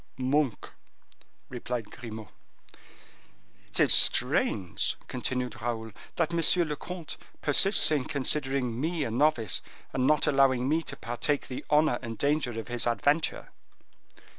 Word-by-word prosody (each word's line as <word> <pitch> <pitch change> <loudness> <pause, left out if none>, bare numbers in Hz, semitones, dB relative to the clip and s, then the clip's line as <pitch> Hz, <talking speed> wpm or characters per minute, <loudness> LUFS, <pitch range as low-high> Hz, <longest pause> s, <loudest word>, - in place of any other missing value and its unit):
"Monk," 130 -1 -1 0.8
replied 120 -2 -6
Grimaud. 110 -4 -9 1.4
"It - - -1
is - - +5
strange," 90 -3 +3
continued 125 0 -4
Raoul, 115 -1 -4 0.2
"that 170 0 -1
monsieur 170 +1 +3
le 150 -1 -4
comte 175 0 -8 0.3
persists 175 +5 +4
in 145 -4 0
considering 135 -4 0
me 160 0 -2
a 115 - -4
novice, 120 - +2 0.3
and 130 0 0
not 155 - +3
allowing 135 -3 +2
me 160 +3 +1
to - - -7
partake 130 +5 -2
the 130 - -6
honor 150 -4 +2
and 115 -3 -7
danger 140 -3 -1
of 115 - -8
his 120 -1 -1
adventure." 145 +7 0
130 Hz, 130 wpm, -27 LUFS, 120-150 Hz, 1.4 s, is